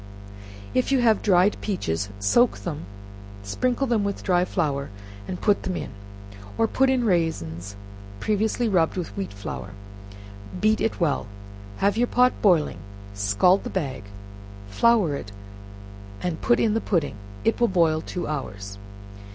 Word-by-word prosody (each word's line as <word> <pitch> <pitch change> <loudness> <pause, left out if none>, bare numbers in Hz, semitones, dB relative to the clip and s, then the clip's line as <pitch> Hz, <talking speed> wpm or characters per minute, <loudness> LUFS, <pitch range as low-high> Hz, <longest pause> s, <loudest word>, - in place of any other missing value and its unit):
If 255 +1 +1
you 270 - +4
have 225 -3 +4
dried 190 0 +4
peaches, 100 - -2
soak 240 - +3
them; 155 -3 -5 0.6
sprinkle 250 - 0
them 230 -5 +1
with 200 -1 -3
dry 180 -2 +2
flour, 140 -6 -1 0.4
and 180 - -4
put 205 -2 +2
them 185 - -3
in, - - -5 0.7
or 225 - +3
put 265 +4 +2
in 260 -2 +2
raisins, 100 - -1 0.4
previously 215 - 0
rubbed 180 -4 +2
with 165 - -4
wheat 100 0 -4
flour 100 0 -7 0.9
beat 215 +2 +2
it 225 - -1
well; 150 - 0 0.5
have 200 +1 +1
your 245 +1 +3
pot 250 +1 +4
boiling, 170 - +3 0.3
scald 100 - +3
the - - -5
bag, 135 - -3 0.6
flour 210 - +3
it, 100 -7 -7 0.9
and 175 -3 -2
put 240 - +3
in 220 -2 +2
the 225 - 0
pudding, 160 - -1 0.3
it 225 +1 +1
will 240 - +5
boil 165 -5 +2
in - - -10
two 180 - -3
hours. 100 -9 -5
180 Hz, 150 wpm, -24 LUFS, 135-220 Hz, 0.9 s, will